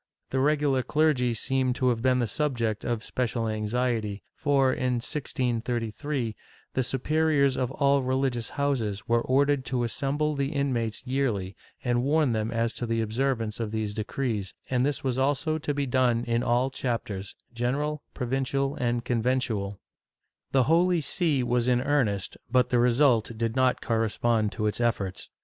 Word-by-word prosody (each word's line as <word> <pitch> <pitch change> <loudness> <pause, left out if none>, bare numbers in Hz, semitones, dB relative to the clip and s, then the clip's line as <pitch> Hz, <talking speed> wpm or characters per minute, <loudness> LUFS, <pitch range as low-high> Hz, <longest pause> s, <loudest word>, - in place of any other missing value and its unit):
The 130 - +1
regular 145 -1 +2
clergy 130 -5 +2
seem 130 +2 +1
to 125 +1 +1
have 115 -2 0
been 130 0 +3
the 120 - +1
subject 115 -4 -1
of 120 -2 -2
special 120 -3 -1
anxiety 110 -1 -1
for, 135 -2 +2
in 125 0 0
1633, 120 -1 -2 0.4
the 130 - +1
superiors 140 +1 +2
of 125 -2 -1
all 140 -1 +3
religious 130 -2 -1
houses 120 -8 0
w^ere 115 0 +3
ordered 140 +1 +2
to 125 -2 -1
assemble 145 +5 -1
the 140 +1 -1
inmates 125 -5 -1
yearly 120 -8 -1 0.3
and 120 -1 +1
warn 145 0 +2
them 110 -1 -1
as 115 0 0
to 120 - -3
the 115 0 0
observance 115 0 -1
of 115 -2 -2
these 110 -1 -2
decrees, 110 -2 -3 0.2
and 125 -1 +2
this 145 0 -1
was 130 -1 0
also 145 +4 +1
to 150 - -2
be 145 -1 -1
done 125 -2 +2
in 115 0 +1
all 125 +2 +1
chapters, 115 -7 -3 0.2
general, 140 +5 -1
provincial 135 +2 -1
and 120 -1 -1
conventual,^ 115 -5 0 0.7
The 135 -2 +4
Holy 170 +3 +3
See 145 -2 +1
was 120 0 +1
in 125 -1 +3
earnest, 125 -8 0
but 125 0 +3
the 120 - +4
result 120 -2 +3
did 115 0 -1
not 130 -1 +2
correspond 115 -1 +1
to 105 - -2
its 105 +3 -1
efforts. 105 -6 -1
125 Hz, 160 wpm, -27 LUFS, 115-135 Hz, 0.7 s, The